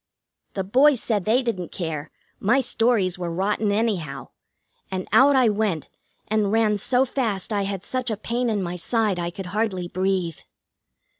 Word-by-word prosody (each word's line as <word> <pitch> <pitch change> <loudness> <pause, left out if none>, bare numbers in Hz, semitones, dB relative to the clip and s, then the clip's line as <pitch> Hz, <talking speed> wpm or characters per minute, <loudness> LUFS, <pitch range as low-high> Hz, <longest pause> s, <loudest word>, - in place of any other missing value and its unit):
The 195 - -1
boys 260 +7 +4
said 210 -5 -1
they 240 +5 +3
didn't 190 -8 -3
care, 160 -4 -4 0.3
my 235 +7 +3
stories 225 -7 +1
were 175 -1 -3
rotten 205 +4 0
anyhow, 190 - -1 0.6
and 185 -1 -4
out 280 +1 +6
I 255 -3 +5
went 205 -7 0 0.4
and 215 -2 +1
ran 215 -2 +2
so 250 +5 +2
fast 225 -6 -2
I 200 -1 0
had 195 -1 -4
such 255 -1 -2
a 220 - -2
pain 235 +3 -1
in 205 -3 0
my 175 0 -4
side 210 0 0
I 170 0 -2
could 190 +2 -7
hardly 200 -5 -1
breathe. 185 -3 -1
205 Hz, 165 wpm, -24 LUFS, 185-230 Hz, 0.6 s, out